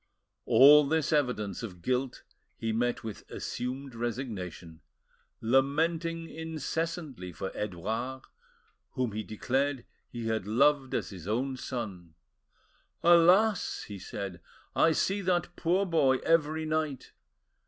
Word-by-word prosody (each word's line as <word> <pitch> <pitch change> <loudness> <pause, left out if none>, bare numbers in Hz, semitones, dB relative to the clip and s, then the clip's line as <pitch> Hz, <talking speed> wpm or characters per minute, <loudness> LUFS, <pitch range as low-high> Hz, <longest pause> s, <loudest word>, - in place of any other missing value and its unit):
All 140 +5 +8
this 160 0 +1
evidence 125 - 0
of 90 -7 -8
guilt 130 +2 -1 0.3
he 115 - -2
met 120 +2 0
with 110 -2 -7
assumed 130 +2 -5
resignation, 105 - -5 0.6
lamenting 160 +7 +1
incessantly 160 - -4
for 95 +3 -5
Edouard, 110 +7 -4 0.7
whom 125 -3 -1
he 105 +1 -3
declared 130 +5 -1 0.2
he 120 -1 -6
had 110 -3 -1
loved 135 +4 +3
as - - -2
his 90 -3 -9
own 130 +5 -1
son. 95 -11 -6 0.9
"Alas!" 180 +5 +5
he 100 -2 -8
said, 95 -2 -6 0.3
"I 165 - +5
see 195 +5 +1
that 175 -1 0
poor 180 +4 +1
boy 140 -7 +3
every 160 -1 +2
night! 155 -4 -2
130 Hz, 115 wpm, -29 LUFS, 110-160 Hz, 0.9 s, All